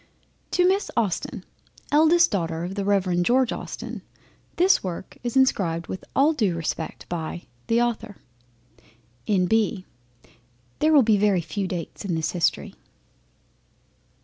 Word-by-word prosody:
To 360 0 +3
Miss 390 +2 +1
Austen, 210 -6 -1 0.5
eldest 320 +3 +5
daughter 165 -4 -2
of 180 +2 -4
the 200 0 -3
Rev. 190 -3 +1
George 250 +6 +2
Austen, - - -7 0.5
this 365 +2 +4
work 185 0 -6
is 240 +1 -1
inscribed 170 -10 +2
with 185 - -7
all 290 +4 +4
due 210 - 0
respect 165 -1 -4
by 170 0 -5 0.2
THE 230 +1 +2
AUTHOR. 225 -3 -2 1.1
N.B. 200 0 +1 0.9
There 310 - +3
will 290 -4 +6
be 220 -2 +3
very 200 -3 +2
few 190 +4 -3
Dates 175 +1 -6
in 185 -4 -2
this 160 -1 -1
History. 170 -3 -1
200 Hz, 130 wpm, -24 LUFS, 175-250 Hz, 1.1 s, will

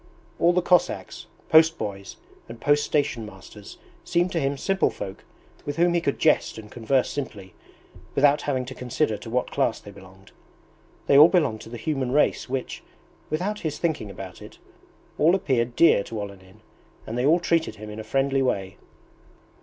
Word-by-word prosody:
All 170 - +5
the 180 0 +1
Cossacks, 180 0 0 0.2
post 160 +1 +6
boys, 100 -2 -6 0.3
and 115 0 -9
post 145 +3 +2
station 140 -6 0
masters 100 0 -12 0.3
seemed 175 +1 0
to 165 - 0
him 140 -1 -1
simple 195 +6 +1
folk 95 -2 -8 0.4
with 145 0 -5
whom 170 +1 +3
he 170 - +1
could 140 -4 -1
jest - - +2
and 105 -1 -10
converse 125 +2 0
simply, 105 -10 -6 0.6
without 145 +1 +4
having 130 -3 -2
to 130 - -8
consider 125 -1 -1
to 115 - -10
what 125 +2 -1
class 135 -5 0
they 100 - -12
belonged. 95 0 -16 0.7
They 140 - +6
all 150 - +10
belonged 140 - +1
to 110 - -11
the 120 - -7
human 130 0 -2
race 150 -3 +1
which, 130 -1 -4 0.5
without 190 +7 -2
his 155 -2 -3
thinking 160 -11 -2
about 95 -2 -9
it, - - -12 0.6
all 165 +5 +5
appeared 125 -9 0
dear 165 -11 +5
to 115 - -6
Olenin, 100 0 -10 0.4
and 110 - -5
they 125 +3 +1
all 165 +4 +5
treated 165 -7 0
him 105 0 -9
in 105 - -8
a - - -5
friendly 135 +4 0
way. 95 -7 -2
130 Hz, 175 wpm, -24 LUFS, 110-155 Hz, 0.7 s, all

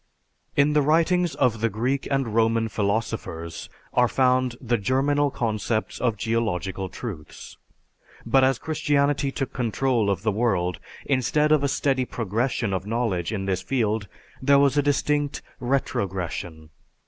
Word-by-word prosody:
In 145 +1 +4
the 150 - +4
writings 165 +3 +2
of 120 -5 +1
the 115 - +2
Greek 125 +6 -1
and 135 -5 0
Roman 115 0 +2
philosophers 100 -6 -3 0.2
are 125 0 +4
found 130 -1 +2
the 120 -2 0
germinal 140 +6 +2
concepts 110 -3 -2
of 115 -3 +1
geological 100 -4 -2
truths. 95 -11 -8 0.7
But 130 +3 +4
as 130 -1 +3
Christianity 145 -2 0
took 135 -1 -4
control 120 -2 0
of 95 -1 -1
the 110 - +2
world 95 -7 0 0.3
instead 145 +3 +2
of 150 -2 +4
a - - +3
steady 135 -2 +1
progression 115 0 -1
of 95 +1 -3
knowledge 110 -7 -1
in 100 -3 -3
this 95 -1 -1
field 110 -2 -1 0.3
there 140 +1 +5
was 140 0 +4
a 145 - +4
distinct 145 0 0 0.2
retrogression. 90 - -3
120 Hz, 140 wpm, -24 LUFS, 105-135 Hz, 0.7 s, there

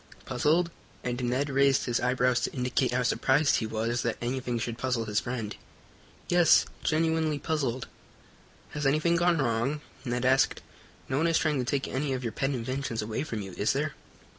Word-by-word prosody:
"Puzzled?" 155 +7 +1 0.3
and 125 0 -2
Ned 130 +4 0
raised 135 0 +3
his 120 -2 0
eyebrows 125 0 +2
to 125 - -2
indicate 125 0 0
how 125 +1 +1
surprised 140 +4 +3
he 110 - -2
was 115 +2 -1
that 120 -2 -1
anything 125 0 -2
should 115 0 -4
puzzle 125 -3 -1
his 105 -1 +1
friend. 115 -4 -4 0.7
"Yes, 175 -2 +5 0.2
genuinely 160 -1 +1
puzzled." 140 -5 -2 0.9
"Has 150 -2 -1
anything 155 +4 +2
gone 170 0 +3
wrong?" 135 +2 0 0.2
Ned 125 -1 -2
asked. 130 +1 +3 0.4
"No 130 - -1
one 165 - +2
is 165 -1 +3
trying 150 -4 +1
to 125 - -1
take 140 +2 -1
any 135 +1 -1
of 130 -1 -3
your 115 - -3
pet 135 - 0
inventions 130 -2 -2
away 110 +1 -3
from 110 -9 -4
you, 95 - -8
is 105 - +2
there?" 145 +2 -1
130 Hz, 180 wpm, -28 LUFS, 120-150 Hz, 0.9 s, Yes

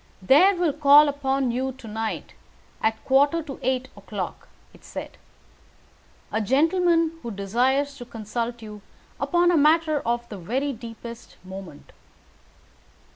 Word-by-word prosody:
"There 310 - +5
will 345 -4 +1
call 295 0 +7
upon 270 -2 0
you 260 +2 -2
to 250 -2 -13
night, 220 +1 -4 0.5
at 220 0 +2
a - - -27
quarter 285 +5 +3
to 275 -3 -8
eight 260 0 -1
o'clock," - - -6 0.3
it - - -19
said, - - -8 1.2
"a 220 - 0
gentleman 330 - +2
who 235 - -6
desires 250 +8 0
to 245 - -8
consult 235 +1 -5
you 210 -1 -9 0.4
upon 350 0 +2
a 345 - +3
matter 310 0 +3
of 235 +1 -2
the 205 - -7
very 265 +11 -2
deepest 235 0 -10
moment. 185 -5 -10
260 Hz, 135 wpm, -24 LUFS, 225-295 Hz, 1.2 s, call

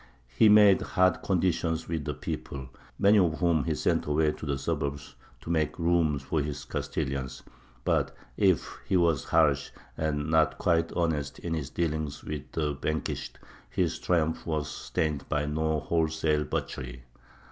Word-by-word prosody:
He 110 - +6
made 105 -2 +7
hard 95 -4 +2
conditions 85 -3 0
with 80 -3 -3
the 75 -2 -3
people, 65 -2 -5 0.3
many 100 +1 +5
of 85 -4 +2
whom 85 -6 +2
he - - 0
sent - - 0
away 75 +1 +2
to 75 - -8
the 70 -1 0
suburbs 70 -1 -3 0.3
to 80 - -5
make 80 -2 0
room 85 -3 +2
for 70 +3 -1
his 75 0 -4
Castilians. 65 -1 -3 0.4
But - - +1 0.2
if - - +1
he 95 - +3
was 85 -5 +2
harsh - - +3 0.3
and 75 -2 -1
not 80 -1 +3
quite 85 -1 +1
honest 80 -5 -1
in 85 - -4
his 75 -5 -3
dealings 80 -4 -2
with 75 -2 -6
the 75 -2 0
vanquished, 75 +3 -3 0.3
his - - -1
triumph 80 -2 0
was 75 -3 -1
stained 75 -3 -2
by 75 -1 0
no 80 +1 0
wholesale 80 -1 0
butchery. - - -4
80 Hz, 155 wpm, -28 LUFS, 75-85 Hz, 0.4 s, made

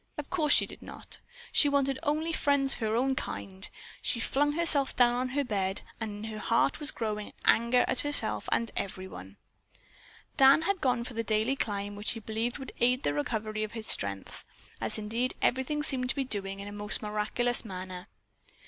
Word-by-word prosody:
Of 295 -1 -6
course 310 -5 +2
she - - +6
did - - -11
not. - - -6 0.3
She 290 - +6
wanted 275 -1 +1
only 315 +1 0
friends 280 -3 +2
of - - -5
her 220 -1 0
own 265 +3 +2
kind. 190 -6 -5 0.3
She 235 - 0
flung 290 +5 +1
herself 300 -4 +2
down 240 -1 +5
on 250 +1 -1
her 285 +3 0
bed 195 -5 -2 0.2
and 215 -1 -4
in 220 - -5
her 215 - -6
heart 230 +5 +2
was 295 -1 -3
a - - -4
growing 210 -2 -3
anger 235 +2 +4
at 260 - +3
herself 290 0 +1
and 230 - +1
at - - -12
everyone. 185 - -7 1.0
Dan 275 +4 +7
had 390 +1 0
gone 250 -3 +2
for 245 - -7
the 230 0 -2
daily 220 +4 +1
climb 205 -4 -2
which 205 +1 0
he 225 - -6
believed 225 +2 -2
would 270 -2 -7
aid 250 +2 +3
the 145 - +1
recovery 215 +8 -2
of 215 - -5
his 225 -2 -4
strength, 100 - -3 0.4
as - - -2
indeed 225 +4 -1
everything 265 +4 +1
seemed 255 -4 0
to - - +1
be 275 - 0
doing 195 -4 -2
in 200 - -6
a - - -6
most 205 +1 +2
miraculous 215 +3 -1
manner. 185 -3 -7
235 Hz, 200 wpm, -30 LUFS, 210-270 Hz, 1.0 s, Dan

